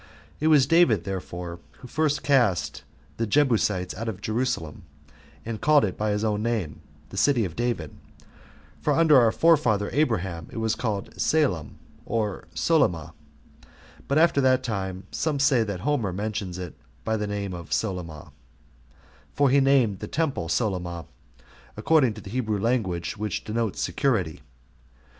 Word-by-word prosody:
It 155 - +1
was 150 -4 +6
David, 140 - +4
therefore, 90 -2 -6
who 125 - -13
first 150 +2 0
cast 120 -10 +2 0.4
the 115 - -1
Jebusites 105 -8 +1
out 115 +3 -4
of 100 -4 -6
Jerusalem, 110 - -2 0.6
and 115 -1 -5
called 150 -3 +5
it 95 - -4
by 105 0 -1
his 105 +1 -1
own 105 -1 0
name, 110 -9 -2 0.3
The 95 - -9
City 120 0 +3
of 85 -4 -6
David: 120 - -2 0.9
for - - +1
under 160 -4 +6
our 115 -2 +4
forefather 120 -12 +3
Abraham 95 - 0
it - - -10
was 110 -1 0
called 105 -5 -3
[Salem, 135 - +1 0.3
or] 105 -4 -3
Solyma; 85 - +1 0.5
5 - - -21 0.4
but 140 - +1
after 160 -3 +4
that 130 -1 +3
time, 95 -5 -3
some 150 -1 -1
say 135 -3 +3
that 100 -4 -5
Homer 120 -6 0
mentions 100 -2 -4
it 90 -3 -6 0.3
by 110 - 0
that 105 -1 -2
name 100 -2 -3
of 85 -1 -8
Solyma, 90 -7 -3 1.0
[for 140 -2 +3
he 140 - +5
named 135 -8 +3
the - - -6
temple 140 - -1
Solyma, 90 -5 -2 0.7
according 140 -9 +3
to 105 - -9
the 100 - -10
Hebrew 110 -4 -1
language, 100 -7 -1
which 105 -2 -3
denotes 110 -1 -2
security. 95 - 0
110 Hz, 150 wpm, -25 LUFS, 95-130 Hz, 1.0 s, was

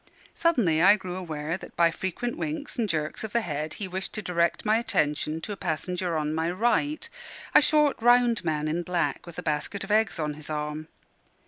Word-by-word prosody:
Suddenly 235 - +2
I 195 +4 +8
grew 185 -3 -6
aware 165 -2 -3
that - - -12
by 170 -1 +4
frequent 190 +8 -3
winks 300 -1 -4
and 230 -4 -1
jerks 155 +2 -2
of 220 - -5
the 235 - +3
head 155 -4 -3
he 200 - -4
wished 190 +1 -4
to 215 - -4
direct 170 +1 0
my 215 +1 +4
attention 155 -6 0
to 210 - -6
a - - -3
passenger 180 0 -2
on 150 0 -1
my 160 +1 0
right 240 - 0 0.5
a - - +8
short, 300 -5 +3
round 240 -2 +4
man 155 -2 -1
in 165 +3 0
black, 175 0 -1
with 170 - -10
a - - -5
basket 155 +6 -2
of 195 - -6
eggs 220 -1 +2
on 150 -2 -2
his 150 +1 -10
arm. 150 0 -3
180 Hz, 205 wpm, -27 LUFS, 155-220 Hz, 0.5 s, I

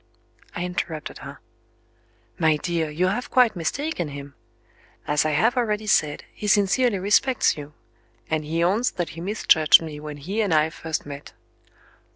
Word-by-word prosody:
I 175 - -2
interrupted 165 -4 -5
her. - - -10 1.0
"My 160 -2 +3
dear, 165 0 -2
you 160 +5 0
have 210 +7 -2
quite 245 -4 +4
mistaken 180 - -2
him. 140 -1 -9 0.7
As 150 +1 +1
I - - +2
have 220 - +2
already 215 -3 -1
said, 155 -8 +1
he 210 - -6
sincerely 205 +3 +3
respects 210 +7 +2
you 150 0 -9 0.5
and 155 -1 -1
he 165 +3 -1
owns 210 +8 +2
that 175 -2 -3
he 165 - -9
misjudged 175 -5 +5
me 155 -2 -7
when 150 -1 -7
he 190 +10 -3
and 195 -7 +1
I 155 +1 +3
first 160 -1 -4
met." 145 0 -9
170 Hz, 160 wpm, -24 LUFS, 150-210 Hz, 1.0 s, misjudged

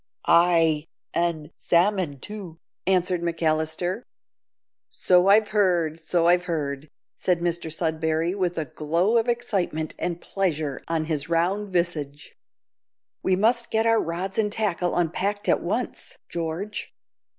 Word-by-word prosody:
"Ay, 165 -3 +4 0.3
an' 170 -3 -1
salmon 175 -5 +1
too," 195 -2 -8 0.3
answered 180 -2 +2
McAllister. 165 +3 -1 0.9
"So 180 0 +3
I've 210 +1 +5
heard, 175 -6 +1
so 165 +1 +1
I've 175 +1 +4
heard," 150 -4 -3 0.3
said 180 -2 +1
Mr 170 -1 -2
Sudberry, 160 +1 0
with 180 -3 -1
a 160 - -1
glow 170 - +1
of 225 - +1
excitement 195 -10 -1
and 175 -1 -2
pleasure 155 -9 -2
on 165 -1 0
his 155 -1 -2
round 185 +5 +1
visage. 160 -6 -2 0.9
"We 190 - +2
must 235 +5 +2
get 220 0 +1
our 225 0 +4
rods 180 +5 -3
and 210 -1 +1
tackle 190 -5 0
unpacked 190 +4 -1
at - - +3
once, - - -3
George. 170 +5 -4
175 Hz, 130 wpm, -25 LUFS, 160-195 Hz, 0.9 s, I've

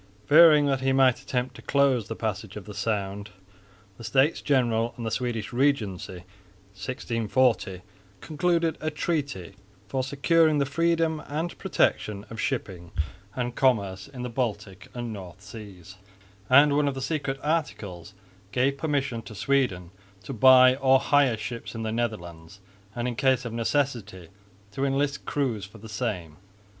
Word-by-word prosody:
Fearing 155 0 +7
that 135 -2 0
he 135 0 +2
might 130 -2 +4
attempt 125 0 -2
to - - -11
close 135 -6 +2
the 115 - -5
passage 110 -2 -4
of 105 -3 -8
the 105 - -9
Sound, 100 0 -3 0.7
the - - -9
States 135 +7 +2
General 120 -4 +1
and 120 - -5
the 110 - -2
Swedish 115 -2 -3
Regency 120 -9 0
in 95 +5 -7
1640 115 -8 +1 0.4
concluded 165 - 0
a 155 - -1
treaty 140 - -3 0.3
"for 130 +5 -1
securing 155 +4 +2
the 140 - +2
freedom 165 +1 +1
and 160 +4 -3
protection 105 -1 0
of 115 - -7
shipping 95 -9 -3 0.5
and 125 -1 -2
commerce 100 -7 +1
in 130 -3 -8
the 125 - -3
Baltic 105 -6 -4
and 120 -2 -4
North 95 -3 -9
Seas"; 100 -4 -11 0.5
and 140 +2 +6
one 145 0 +2
of 140 - -1
the - - -4
secret 145 -3 -2
articles 105 - -3 0.4
gave 135 +5 +1
permission 140 -6 -1
to 110 0 -11
Sweden 100 -7 0 0.3
to 135 - -6
buy 130 +1 +7
or 135 -1 +4
hire 140 -6 +3
ships 115 +2 -6
in 115 - -4
the 110 - -2
Netherlands 95 -7 -4 0.4
and 120 0 -2
in 120 - -3
case 130 0 +2
of 115 - -5
necessity 115 - -2 0.4
to 135 +6 -3
enlist 140 +1 0
crews 120 -8 -1
for 105 +3 -14
the 110 +1 -11
same. 100 -8 -4
120 Hz, 155 wpm, -26 LUFS, 105-140 Hz, 0.7 s, Fearing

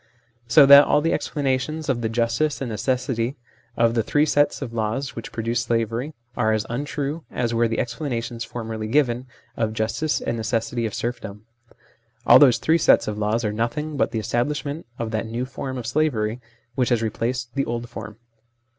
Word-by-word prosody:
So 140 +5 +7
that 140 +1 +9
all 150 - +3
the 165 +2 +1
explanations 145 +2 -1
of 125 -3 0
the 110 - -1
justice 115 +6 0
and 125 -4 -4
necessity 125 +2 -1 0.4
of 115 0 +3
the 115 - +2
three 145 +7 +2
sets 145 -1 +2
of 120 -4 -7
laws 115 +5 -2
which 115 - -7
produce 115 +1 -1
slavery 115 +5 -2 0.2
are 110 -2 +2
as 110 -1 0
untrue 145 +4 -3
as 120 -1 -2
were 115 0 +3
the 115 - -2
explanations 120 -2 -3
formerly 110 -2 -5
given 125 -1 +1 0.3
of 110 -1 0
the 110 - -9
justice 125 +8 0
and 115 - -3
necessity 115 +1 -1
of 105 - -6
serfdom. 110 -3 -5 0.8
All - - +8
those 130 -5 +6
three 165 +1 +2
sets 155 - +4
of 105 0 -3
laws 110 +2 0
are 105 - -1
nothing 120 +8 -2
but - - +1
the 115 - -4
establish 120 +8 -1
ment 145 +1 -5
of 115 -1 -3
that 110 0 -2
new 120 +3 -3
form 130 0 -6
of 120 - -5
slavery 120 -4 0 0.3
which 125 0 0
has 120 -2 +1
replaced 120 +2 -2
the 140 0 0
old 120 0 -4
form. 110 -3 -9
120 Hz, 190 wpm, -23 LUFS, 115-140 Hz, 0.8 s, that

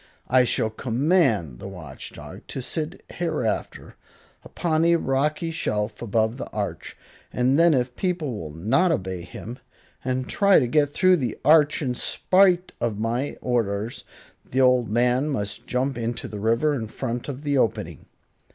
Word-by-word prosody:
I 125 0 +5
shall 110 -2 0
command 115 - +1
the - - -7
Watch 85 -9 -9
Dog - - -10
to - - -5
sit 155 +6 -4
hereafter 155 -10 -3 0.5
upon 160 -2 -1
a 170 0 +5
rocky 150 +2 0
shelf 105 -8 -2
above 110 +1 0
the - - -5
arch, - - -5 0.3
and 130 +4 +2
then 170 -2 +5
if 125 -1 -1
people 170 - -2
will 80 -7 -6
not 115 - +2
obey 95 - -2
him, 110 +8 -9 0.4
and 130 0 -2
try 200 -1 +4
to 130 - +3
get 145 +4 +2
through 185 +5 +4
the 125 -7 -3
arch 150 0 +5
in 125 -3 0
spite 185 +6 +2
of 115 -4 -1
my 120 +6 -2
orders, 115 -2 -1 0.4
the 130 - -3
old 125 -3 +4
man 125 +5 +2
must 100 -8 -4
jump 125 0 -1
into 115 +1 -3
the 105 - -7
river 115 +8 +2
in 115 -6 -3
front 120 +3 -4
of 140 +1 -6
the 145 -2 +1
opening. 110 -6 -2
125 Hz, 160 wpm, -24 LUFS, 110-150 Hz, 0.5 s, I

